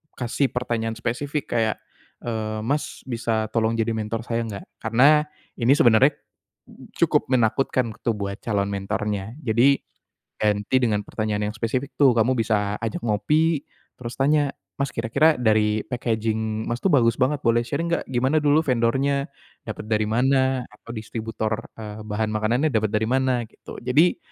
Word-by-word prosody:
kasih 130 +3 0
pertanyaan 115 -2 -2
spesifik 140 +5 -3
kayak, 110 -2 +1 0.5
eee, 110 -2 -3
"Mas 145 +6 -2
bisa 115 -3 -1
tolong 115 0 +1
jadi 115 0 0
mentor 110 +1 -3
saya 115 0 -2
enggak?" 100 -2 -7
karena 140 +7 +4 0.3
ini 125 +4 +4
sebenarnya 125 +2 +5 0.8
cukup - - +2
menakutkan 125 0 +1
gitu 115 - -1
buat 100 +1 -4
calon 100 -3 0
mentornya. 100 +2 -3
Jadi, 125 +4 +4 0.6
ganti 105 +3 +1
dengan 105 -3 +2
pertanyaan 105 -1 -2
yang 105 - -10
spesifik 125 +5 -2
itu 135 -4 +5
kamu 120 +3 +2
bisa 105 -2 0
ajak 115 - -2
ngopi, 145 +8 +1 0.3
terus 120 -1 -7
tanya, 145 0 +3 0.2
"Mas 140 0 -2
kira-kira 140 +8 +3
dari, 110 -2 +2
packaging 110 -3 -2
Mas 120 +1 -3
tuh 190 - +3
bagus 115 -4 +4
banget, 135 +2 +1
boleh 120 0 +2
sharing 145 +8 -2
enggak - - 0
gimana 130 +5 +2
dulu 145 +2 +5
vendornya, 135 +2 +1 0.4
dapet 105 - -7
dari 110 -1 +1
mana?" 130 +2 +2
atau, 105 +2 -12
"Distributor, 110 0 -4 0.2
eee, 105 0 -7
bahan 110 +1 -2
makanannya 120 +8 +1
dapet 110 -1 +1
dari 110 +1 +1
mana?" 130 -2 +1
gitu. - - -12
Jadi 145 - +3
115 Hz, 150 wpm, -23 LUFS, 110-130 Hz, 0.8 s, sebenarnya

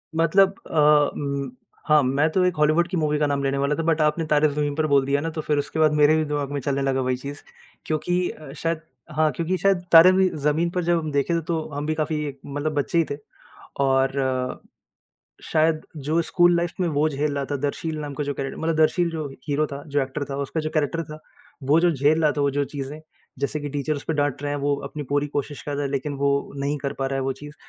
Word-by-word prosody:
मतलब 190 +4 +4
अ - - -13
अम, 145 -3 +2 0.4
हाँ 150 -1 +6
मैं 140 +4 +2
तो 185 +3 +2
एक 180 - +1
हॉलीवुड 155 +3 +3
की 185 0 -3
मूवी 150 -2 +1
का 150 - +2
नाम 140 -1 -1
लेने 135 0 0
वाला 140 +2 +1
था 165 - -2
बट 160 -1 +1
आपने 150 +2 +1
तारे 150 +1 +5
ज़मीन 145 -1 -1
पर 155 0 +1
बोल 140 -2 +3
दिया 140 +1 +1
ना 165 - -2
तो 155 - 0
फिर 150 -1 0
उसके 145 +2 -2
बाद 155 -1 +5
मेरे 150 +1 +5
भी 160 - +2
दिमाग 145 -2 -2
में 145 - -2
चलने 140 0 -1
लगा 135 -1 +1
वही 130 0 0
चीज़, 140 +3 -8 0.4
क्योंकि 155 -2 -2
शायद 165 0 -1 0.3
हाँ, 155 0 +2
क्योंकि 170 +4 -1
शायद 190 0 +2
तारे 170 +2 +9
भी 190 0 +3
ज़मीन 155 +3 +2
पर 180 0 -1
जब 170 0 +2
हम 155 -1 -4
देखे 140 +4 +1
थे, 165 - 0
तो 160 0 -2
हम 145 +1 -3
भी 155 - -1
काफ़ी 150 -2 -2
मतलब 145 +2 -3
बच्चे 145 +4 0
ही 165 - +5
थे 140 - -3 0.7
और 135 -1 +1 0.9
शायद 155 0 +2 0.2
जो 160 +3 +2
स्कूल 175 +1 +3
लाइफ़ 170 0 -1
में 180 - +2
वो 150 0 +2
झेल 145 0 -1
रहा 140 -1 -1
था - - +1
दरशील 155 +2 -2
नाम 145 -2 -5
का 145 - -3
जो 145 0 -2
कैरेक्टर 135 0 -5
मतलब 165 0 0
दरशील 165 +2 +3
जो 155 -3 -4 0.2
हीरो 150 +1 +1
था 140 0 -6
जो 145 0 +1
एक्टर 135 +2 -3
था 135 - -3
उसका 140 +3 -3
जो 155 - -3
कैरेक्टर 155 +2 0
था 155 0 -8 0.4
वो 145 +4 +4
जो 175 0 +3
झेल 150 +3 +2
रहा 150 - +4
था 145 - +1
वो 140 - +3
जो 145 +1 0
चीज़ें 145 +1 -5 0.4
जैसे 140 +2 -1
कि 145 0 -5
टीचर्स 145 +1 -2
उस 140 - -6
पे 160 - 0
डांट 145 -1 -1
रहे 145 - -1
हैं 145 - -2
वो 145 0 +1
अपनी 150 - -6
पूरी 145 +1 +1
कोशिश 145 0 -4
कर 145 - -4
रहा 145 - -2
है। - - -2
लेकिन 140 +1 -2
वो 140 +1 +2 0.3
नहीं 145 +1 -1
कर 140 - -2
पा 135 - 0
रहा 135 - -3
है 135 - -1
वो 135 0 -1
चीज़ 145 +2 -11
150 Hz, 250 wpm, -24 LUFS, 140-160 Hz, 0.9 s, तारे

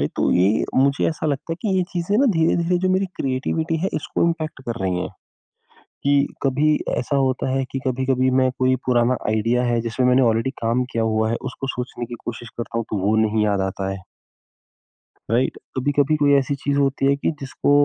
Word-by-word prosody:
नहीं 70 - +1
तो - - +2
ये 95 +4 +3
मुझे 140 +1 +3
ऐसा 160 0 -3
लगता 145 +3 -2
है - - -4
कि 195 -4 +1
ये 185 - +3
चीज़ें 180 +4 0
ना 275 - +4
धीरे-धीरे 170 +2 +2
जो 185 +1 0
मेरी 190 +1 +2
क्रिएटिविटी 150 +5 -1
है 190 - +1
इसको 155 - -1
इम्पैक्ट 155 -4 -3
कर 115 -3 -3
रही 90 -1 0
हैं, - - -3 1.0
कि 140 0 +3 0.2
कभी 145 +3 +3 0.2
ऐसा 125 +4 -1
होता 130 -1 0
है 135 - 0
कि 135 - -2
कभी-कभी 130 0 +1
मैं 130 - +3
कोई 130 0 +3
पुराना 125 0 +2
आइडिया 115 +3 +1
है 120 -1 +1
जिसमें 120 +2 0
मैंने 125 +1 +4
ऑलरेडी 115 +2 +2
काम 120 +3 +1
किया 115 -1 +1
हुआ 110 0 +1
है 115 - 0 0.2
उसको 135 - -6
सोचने 125 -1 -4
की 120 0 -7
कोशिश 120 0 -6
करता 115 0 -4
हूँ 115 - -1
तो 105 - -1
वो 110 - +3
नहीं 105 0 +1
याद 100 -2 +1
आता 95 0 -2
है। 95 - -5 1.3
राइट? 125 +3 +1 0.2
कभी-कभी 145 +3 +2
कोई 145 -1 +3
ऐसी 140 +1 +2
चीज़ 140 +1 -1
होती 135 -1 +1
है 140 0 +4
कि 140 - -1
जिसको 135 0 -1
130 Hz, 205 wpm, -22 LUFS, 115-145 Hz, 1.3 s, ना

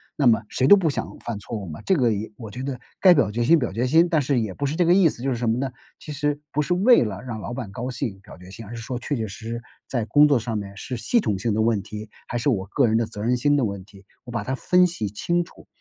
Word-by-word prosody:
那 140 - +2
么 115 -2 +4
谁 130 - 0
都 205 - +9
不 170 -6 +1
想 - - -3 0.2
犯 115 -4 -3
错 110 +2 -6
误 100 -3 -7
嘛， 75 -2 -8
这 190 - +2
个 125 -7 +2
也 105 +2 -4
我 110 -4 -9
觉 125 +4 -7
得 135 -2 -4 0.2
该 185 -2 +8
表 110 -9 +2
决 120 +3 -1
心， 165 +8 +5
表 120 -9 -2
决 120 +5 0
心。 165 +5 +5
但 160 -3 +2
是 135 -1 +1
也 110 -4 -2
不 140 - -7
是 140 +2 0
这 175 +1 +2
个 170 - +5
意 185 -3 +5
思， 120 - -8
就 135 - 0
是 - - 0
什 115 -1 -1
么 115 - +1
呢， 135 0 -2 0.3
其 150 - -8
实 145 +1 -1
不 150 - +1
是 175 +4 0
为 225 - +5
了 105 -5 -4
让 115 -4 -6
老 115 - -6
板 120 -5 -5
高 120 +6 -5
兴 120 -6 -4
表 90 - -13
决 90 +1 -13
心， 115 - -9
而 110 +3 -9
是 - - -7
说 125 0 -4
确 145 - -2
确 115 -3 -2
实 110 +2 -9
实， 115 +1 -4 0.3
在 120 -4 -2
工 145 +6 +5
作 140 -3 +4
上 115 0 -3
面 100 -1 -5
是 125 - -5
系 120 - +2
统 105 - -1
性 115 +3 -1
的 110 - +2
问 110 -3 +2
题， 105 +1 -9 0.2
还 120 - -3
是 120 - -2
我 110 -9 +2
个 130 +7 +2
人 110 -1 +2
的 115 -1 +1
责 105 - -7
任 120 +2 +2
心 145 +4 +2
的 135 - +2
问 100 -3 -4
题， 95 -1 -17 0.2
我 120 - -10
把 120 - -2
它 130 - -3
分 180 +7 +3
析 170 -12 -2
清 170 - 0
楚。 175 - -18
120 Hz, 340 characters per minute, -23 LUFS, 110-145 Hz, 0.3 s, 都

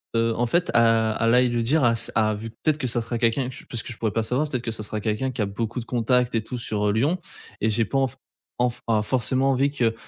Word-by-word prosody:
heu, 115 0 +2
en 120 - +1
fait 175 +9 +1
a 115 -1 +3
elle 115 0 +3
aille 125 0 +5
le 120 0 0
dire 135 +3 +2
à 115 - +4
s 115 - 0
à 110 0 +3
v 110 +2 -6
peut-être 150 +7 -1
que 145 - -3
ça 120 0 0
serait 115 +1 -3
quelqu'un 120 +3 +1
puisque 130 - -9
parce 120 - -3
que 120 - -7
je - - -14
pourrais 110 -3 -1
pas 115 - 0
savoir 130 +7 -1
peut-être 130 -4 -2
que 115 - -3
ce 110 -1 -4
sera 105 0 -4
quelqu'un 110 +5 -1
qui 120 - -4
a - - +2
beaucoup 115 +4 -3
de 115 - -6
contact 125 0 +1
et 110 - +1
tout 125 - -5
sur, 105 -3 -2
heu, 105 - +3
Lyon. 140 - +1 0.4
Et 110 - +2
j'ai 110 +1 +1
pas 135 - -2
en 135 - +3
f 125 - -12 0.4
en 125 0 +3 0.3
f 105 - -6
forcément 130 +2 +2
envie 135 +2 +2
qu'elle 120 -5 +1
115 Hz, 290 wpm, -24 LUFS, 110-130 Hz, 0.4 s, aille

